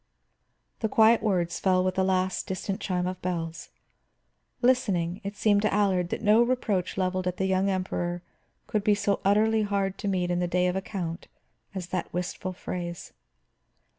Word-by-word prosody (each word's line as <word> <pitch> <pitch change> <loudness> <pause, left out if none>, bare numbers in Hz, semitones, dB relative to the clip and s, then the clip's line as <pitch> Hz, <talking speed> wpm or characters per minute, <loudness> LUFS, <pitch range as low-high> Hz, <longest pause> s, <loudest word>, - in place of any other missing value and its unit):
The 220 - -1
quiet 225 +2 +5
words 175 -5 0
fell 185 -1 +3
with 185 0 0
the 190 - +1
last 185 0 0
distant 190 0 -3
chime 180 -2 -1
of 185 0 -4
bells. 165 -2 -4 0.9
Listening, 195 -8 +2
it 200 +1 -5
seemed 205 -1 +3
to 215 - +1
Allard 190 -4 +2
that - - -4
no 215 +2 +5
reproach 235 -8 0
leveled 185 -1 0
at 180 - -2
the 190 - 0
young 190 +1 +2
Emperor 175 -2 -2 0.4
could 210 -2 -1
be 210 0 +4
so 200 0 0
utterly 215 +3 +3
hard 200 -2 -1
to - - -3
meet 180 -2 0
in 175 - 0
the 175 - 0
day 180 +1 +1
of 180 0 0
account 185 -3 -4 0.5
as 180 -2 -5
that 180 -1 -3
wistful 180 +1 -3
phrase. 175 -1 -6
185 Hz, 170 wpm, -27 LUFS, 180-205 Hz, 0.9 s, quiet